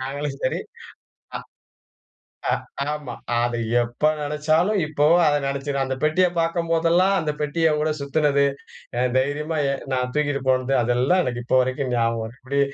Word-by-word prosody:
நாங்களும் 140 Hz, +2 st, -4 dB
சரி. 130 Hz, -, 0 dB, 0.8 s
அ -, -, -3 dB, 1.1 s
அ -, -, +1 dB, 0.4 s
ஆமா, 145 Hz, -5 st, -6 dB, 0.2 s
அத 120 Hz, 0 st, 0 dB, 0.3 s
எப்போ 120 Hz, +6 st, 0 dB
நெனைச்சாலும், 155 Hz, +7 st, +1 dB
இப்போவும் 155 Hz, +3 st, +3 dB
அதை 145 Hz, 0 st, +3 dB
நினைச்சி 140 Hz, +1 st, -3 dB
அந்த 130 Hz, 0 st, -3 dB
பெட்டிய 180 Hz, +4 st, +3 dB
பாக்கும்போதெல்லாம், 165 Hz, +2 st, +2 dB
அந்த 155 Hz, -1 st, -1 dB
பெட்டியோட 155 Hz, 0 st, +1 dB
சுத்தினது, 140 Hz, 0 st, +2 dB, 0.5 s
எ 125 Hz, -, +1 dB, 0.2 s
தைரியமா 150 Hz, +4 st, -1 dB, 0.4 s
நான் 125 Hz, -1 st, -1 dB
தூக்கிட்டு 145 Hz, -2 st, 0 dB
போனது. 130 Hz, +1 st, +1 dB
அதெல்லாம் 125 Hz, +10 st, +2 dB
எனக்கு 120 Hz, -1 st, -3 dB
இப்போ 130 Hz, -, +2 dB
வரைக்கும் 130 Hz, 0 st, -2 dB
ஞாபகம் 115 Hz, -1 st, 0 dB
வருது. 115 Hz, +4 st, -9 dB
இப்படி 140 Hz, +2 st, -1 dB
145 Hz, 135 wpm, -23 LUFS, 130-155 Hz, 1.1 s, இப்போவும்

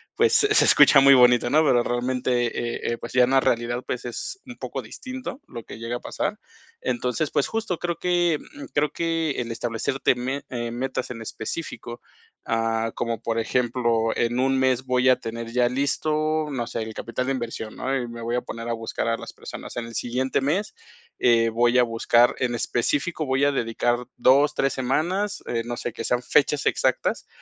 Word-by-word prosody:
pues, 455 Hz, 0 st, +3 dB
se 420 Hz, +1 st, +5 dB
escucha 140 Hz, -, +7 dB
muy 140 Hz, 0 st, +8 dB
bonito, 125 Hz, -2 st, +5 dB
¿no? 155 Hz, +2 st, +5 dB
Pero 125 Hz, -5 st, +3 dB
realmente, 125 Hz, 0 st, 0 dB
eh 120 Hz, 0 st, -3 dB
eh, -, -, -4 dB
pues, -, -, -8 dB
ya 125 Hz, 0 st, +6 dB
en -, -, -3 dB
la 135 Hz, -, +5 dB
realidad, 120 Hz, 0 st, 0 dB
pues, 125 Hz, -, -4 dB
es 125 Hz, -, -6 dB
un 250 Hz, -, -8 dB
poco -, -, -5 dB
distinto 255 Hz, +1 st, -7 dB
lo 115 Hz, -, -8 dB
que -, -, -10 dB
llega 115 Hz, +2 st, -4 dB
a -, -, -12 dB
pasar. -, -, -3 dB, 0.4 s
Entonces, 125 Hz, +4 st, -1 dB
pues, 145 Hz, -, +1 dB
justo 225 Hz, -6 st, -2 dB
creo 170 Hz, -1 st, -3 dB
que, 175 Hz, -3 st, +1 dB
mm, 295 Hz, -1 st, -11 dB
creo 145 Hz, +1 st, +2 dB
que 165 Hz, -2 st, -1 dB
el 115 Hz, -1 st, -5 dB
establecerte 115 Hz, +3 st, 0 dB
me 130 Hz, +3 st, -3 dB
eh, 120 Hz, -2 st, -3 dB
metas 125 Hz, +1 st, -3 dB
en 115 Hz, -2 st, -7 dB
específico, 120 Hz, +1 st, -6 dB, 0.4 s
ah, 115 Hz, 0 st, 0 dB
como 115 Hz, -1 st, -2 dB
por 115 Hz, -1 st, -2 dB
ejemplo, 115 Hz, -1 st, +1 dB
en 120 Hz, +1 st, 0 dB
1 135 Hz, +1 st, +2 dB
mes, 130 Hz, -1 st, +1 dB
voy 125 Hz, 0 st, +2 dB
a 130 Hz, -, +4 dB
tener 115 Hz, 0 st, -6 dB
ya 120 Hz, 0 st, +2 dB
listo, 155 Hz, +3 st, 0 dB
no 125 Hz, -4 st, -2 dB
sé, 115 Hz, -, -4 dB
el 110 Hz, 0 st, -5 dB
capital 125 Hz, +2 st, -3 dB
de -, -, +1 dB
inversión, 115 Hz, -3 st, -5 dB
¿no? 135 Hz, +1 st, -2 dB
Y 125 Hz, -3 st, -2 dB
me 115 Hz, 0 st, -8 dB
voy 120 Hz, +1 st, -1 dB
a -, -, 0 dB
poner 115 Hz, -1 st, -7 dB
a -, -, 0 dB
buscar 115 Hz, 0 st, -3 dB
a 115 Hz, 0 st, +1 dB
las -, -, -9 dB
personas. -, -, -9 dB
En 120 Hz, -, -3 dB
el 115 Hz, -, -10 dB
siguiente 130 Hz, +3 st, -1 dB
mes, 175 Hz, -, -1 dB, 0.5 s
eh, 115 Hz, -1 st, +4 dB
voy 120 Hz, +2 st, +2 dB
a 125 Hz, -, +6 dB
buscar 120 Hz, +1 st, +3 dB
en 125 Hz, -2 st, 0 dB
específico 145 Hz, +8 st, -1 dB
voy 135 Hz, +1 st, +2 dB
a 145 Hz, -, +3 dB
dedicar 120 Hz, -2 st, 0 dB, 0.2 s
2 140 Hz, +3 st, +4 dB
3 135 Hz, -, +1 dB
semanas, 175 Hz, +11 st, -1 dB
eh, 115 Hz, -, -1 dB
no 120 Hz, 0 st, -4 dB
sé, 120 Hz, -, -4 dB
que -, -, -6 dB
sean 125 Hz, +2 st, 0 dB
fechas 145 Hz, +2 st, +2 dB
exactas -, -, 0 dB
125 Hz, 200 wpm, -24 LUFS, 120-140 Hz, 0.5 s, muy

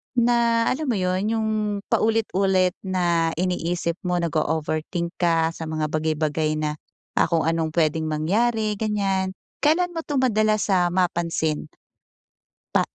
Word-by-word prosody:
na, 235 Hz, -1 st, +3 dB
alam 300 Hz, +2 st, -2 dB
mo 240 Hz, -, +1 dB
'yon, 185 Hz, +4 st, 0 dB
yung 220 Hz, -1 st, 0 dB, 0.4 s
paulit-ulit 195 Hz, -4 st, +2 dB
na 175 Hz, -3 st, 0 dB
iniisip 175 Hz, -1 st, -1 dB
mo 180 Hz, -, +1 dB
nag-o-overthink 160 Hz, +2 st, -1 dB
ka 165 Hz, -2 st, +2 dB
sa 165 Hz, -1 st, -7 dB
mga 155 Hz, -1 st, -2 dB
bagay-bagay 155 Hz, 0 st, 0 dB
na, 150 Hz, 0 st, -2 dB, 0.4 s
ah, -, -, +4 dB
kung 165 Hz, -2 st, +1 dB
anong 160 Hz, -1 st, -1 dB
puwedeng 160 Hz, -1 st, +1 dB
mangyari, 210 Hz, +7 st, 0 dB
ganyan. 195 Hz, -3 st, 0 dB, 0.2 s
Kailan 350 Hz, +4 st, +2 dB
mo 330 Hz, -, -4 dB
'to 295 Hz, -3 st, -4 dB
madalas, 215 Hz, -4 st, +2 dB
ah, 180 Hz, -2 st, +4 dB
mapansin 170 Hz, -3 st, 0 dB, 1.1 s
pa -, -, +5 dB
180 Hz, 130 wpm, -23 LUFS, 160-215 Hz, 1.1 s, pa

